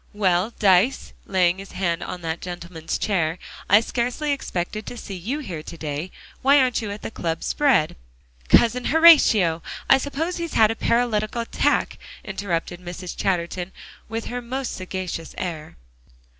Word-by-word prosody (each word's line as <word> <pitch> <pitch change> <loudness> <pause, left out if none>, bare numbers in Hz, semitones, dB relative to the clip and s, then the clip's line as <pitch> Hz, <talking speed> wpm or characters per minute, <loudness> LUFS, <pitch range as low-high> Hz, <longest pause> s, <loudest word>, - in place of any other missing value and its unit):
Well, 190 +1 +2
Dyce," 200 +6 +3
laying 185 -1 +2
his 195 - -10
hand 170 -3 -1
on 180 -1 -6
that 165 0 -3
gentleman's 170 -2 -5
chair, 170 -5 0 0.3
"I 205 +3 +7
scarcely 250 +6 -2
expected 215 -6 -3
to 245 - -6
see 200 - -7
you 200 - -3
here 180 - -6
to 165 - -10
day. 155 +3 -4 0.3
Why 280 +2 +6
aren't 255 -4 +2
you 215 - -4
at 205 +1 -7
the - - -5
club 165 -6 -3
spread?" 265 - +2 0.5
"Cousin 240 +1 +4
Horatio! 250 - +6 0.3
I 270 - +6
suppose 305 +6 -3
he's 335 -2 -4
had 220 -1 +5
a - - -3
paralytic 225 -3 +1
attack," 235 -1 0 0.3
interrupted 180 -3 -3
Mrs. 180 0 -7
Chatterton, 180 0 -1 0.4
with 225 0 -4
her 245 0 -4
most 255 +2 -4
sagacious 185 -3 -5
air. 165 -4 -5
195 Hz, 155 wpm, -23 LUFS, 175-240 Hz, 0.5 s, I